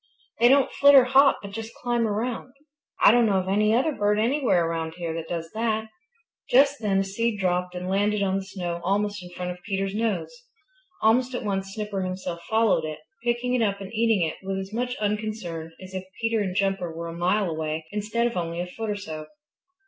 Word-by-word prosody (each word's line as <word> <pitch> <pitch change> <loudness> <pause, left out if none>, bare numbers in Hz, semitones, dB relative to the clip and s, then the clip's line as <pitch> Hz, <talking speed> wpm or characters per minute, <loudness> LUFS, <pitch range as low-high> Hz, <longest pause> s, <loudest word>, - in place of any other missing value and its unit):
They 240 - +6
don't 275 0 +4
flit 285 0 +6
or 265 - +9
hop, 270 +2 +5
but 200 - -7
just 225 +2 -7
climb 240 -2 0
around. 235 +4 -3 0.5
I - - +9
don't 235 0 +4
know 200 -2 +2
of 185 0 -1
any 210 +2 +3
other 260 +7 +3
bird 210 -5 +1
anywhere 230 - +2
around 165 -1 -3
here 170 -2 -4
that 165 0 -5
does 165 -1 -4
that." 220 0 -1 0.6
Just 280 +2 +4
then 200 -3 +1
a 195 - +3
seed 210 +3 -1
dropped 180 -1 0
and 180 0 -4
landed 205 +2 +1
on 190 0 +1
the 195 - -3
snow 180 -3 -5
almost 205 +1 0
in 180 - -10
front 180 0 -5
of 180 0 -9
Peter's 195 -1 -2
nose. 220 - -1 0.7
Almost 245 +3 +3
at - - -3
once 195 -1 -3
Snipper 210 -3 -3
himself 185 -2 -4
followed 220 -7 +3
it, 155 -1 -4 0.3
picking 240 +1 0
it 250 - +2
up 200 -3 +1
and 195 +1 -8
eating 220 -6 +2
it 155 - -5
with 195 0 -3
as 195 +1 -6
much 245 +2 -1
unconcern 210 -6 -3
as 185 0 -11
if 185 -1 -4 0.2
Peter 225 -1 +1
and 190 -3 -2
Jumper 195 -3 0
were 165 +1 -6
a 165 - -6
mile 180 +4 +1
away 155 -1 -3
instead 210 +3 -1
of 240 - -1
only 170 -1 -2
a 175 - -1
foot 220 +5 -5
or 210 - 0
so. 155 -6 -7
200 Hz, 215 wpm, -25 LUFS, 180-225 Hz, 0.7 s, or